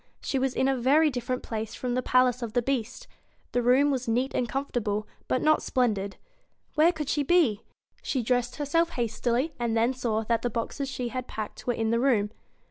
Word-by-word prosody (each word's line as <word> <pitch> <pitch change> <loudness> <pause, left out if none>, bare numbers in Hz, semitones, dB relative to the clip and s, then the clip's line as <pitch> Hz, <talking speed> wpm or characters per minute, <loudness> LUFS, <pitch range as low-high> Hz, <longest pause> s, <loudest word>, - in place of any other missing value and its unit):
She 270 - -1
was 260 -1 0
in 265 - +2
a 270 - +2
very 290 +5 +4
different 250 0 -3
BEAST - - -12
place 220 -1 -3
f - - -14
rom 250 -1 0
the 255 - +1
p - - -11
a 255 - +5
i 255 - +4
ace 250 +1 -6
O 235 - -2
f 215 - -14
the 245 0 +2
Beast. 255 -2 -2 0.5
The 245 - +1
room 260 +4 +4
was 255 -2 -2
neat 250 +4 0
and 240 - -1
comfortable, 225 -6 -2 0.2
but 255 - 0
not 310 0 +4
splendid. 205 -6 0 0.6
Where 315 +2 +5
could 310 -4 -5
she 295 - +1
be? 285 - +3 0.4
She 260 -4 -1
dressed 245 +1 0
herself 330 +3 +1
hastily, 240 +5 0
and 235 -1 0
then 235 +3 +2
saw 225 -4 -1
that 230 0 0
the 245 - 0
boxes 245 +4 -3
she 250 -2 -3
had 255 +1 -4
packed 215 +2 -6
were 245 - +2
in 225 0 0
the 230 - +2
room. 225 -6 +2
250 Hz, 230 wpm, -27 LUFS, 230-270 Hz, 0.6 s, a